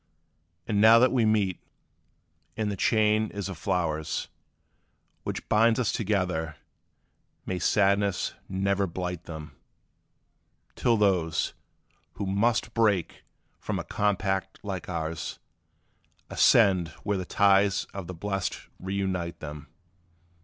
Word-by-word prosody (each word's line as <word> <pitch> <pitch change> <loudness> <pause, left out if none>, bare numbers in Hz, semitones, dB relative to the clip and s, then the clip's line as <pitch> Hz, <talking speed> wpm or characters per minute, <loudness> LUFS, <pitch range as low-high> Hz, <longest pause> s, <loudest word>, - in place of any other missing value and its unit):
And 105 -2 +1
now 110 +1 +8
that 125 +2 +5
we 120 -4 +2
meet, 100 -5 +1 1.0
and 105 -2 -1
the - - -3
chain 110 +1 +2
is 100 -2 -5
of 95 - -6
flowers, 80 -5 -1 0.9
Which - - -5
binds 115 +2 +4
us 120 - +1
together, 90 -7 -1 0.9
may 90 - -3
sadness 100 0 +2 0.2
ne'er 100 +1 0
blight 90 0 -5
them, 80 -3 -8 1.2
Till 115 -2 +2
those, 90 -7 +1 0.6
who - - -4
must 115 +4 +1
break 105 -7 +1 0.3
from - - -3
a - - -3
compact 95 -2 -1
like 95 -4 -5
ours, 80 -2 -4 0.9
Ascend 95 -4 +5 0.2
where 100 -2 0
the - - -3
ties 100 +1 +3
of 95 -3 -6
the 90 - -6
blest 95 +2 -3 0.2
reunite 95 -3 -3
them! 75 -1 -8
95 Hz, 115 wpm, -27 LUFS, 90-105 Hz, 1.2 s, now